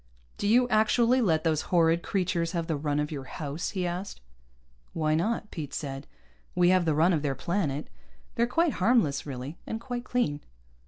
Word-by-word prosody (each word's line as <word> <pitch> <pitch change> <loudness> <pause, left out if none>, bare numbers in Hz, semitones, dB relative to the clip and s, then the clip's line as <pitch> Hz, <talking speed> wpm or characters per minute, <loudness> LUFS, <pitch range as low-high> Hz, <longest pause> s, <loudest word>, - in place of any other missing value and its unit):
"Do 205 - 0
you 245 +4 +5
actually 235 +3 +3
let 160 -8 +2
those 160 -2 +1
horrid 170 -1 +3
creatures 180 -3 -1
have 170 -2 -1
the 165 - -1
run 145 0 -1
of 150 +1 -2
your 140 -3 -5
house?" 145 +3 -4
he 180 - 0
asked. 180 +3 -4 0.7
"Why 155 -1 +1
not?" 210 +6 -1
Pete 150 -5 -6
said. 135 -1 -5 0.5
"We 175 0 +4
have 185 -1 +4
the 160 -2 +2
run 165 +4 +4
of 155 - +1
their 140 -2 -1
planet. 155 -3 -2 0.5
They're 235 -1 +1
quite 330 +4 +2
harmless, 185 - +2
really. 135 +3 -6
And 225 - -3
quite 245 0 -5
clean." 195 -14 -1
170 Hz, 180 wpm, -28 LUFS, 150-215 Hz, 0.7 s, you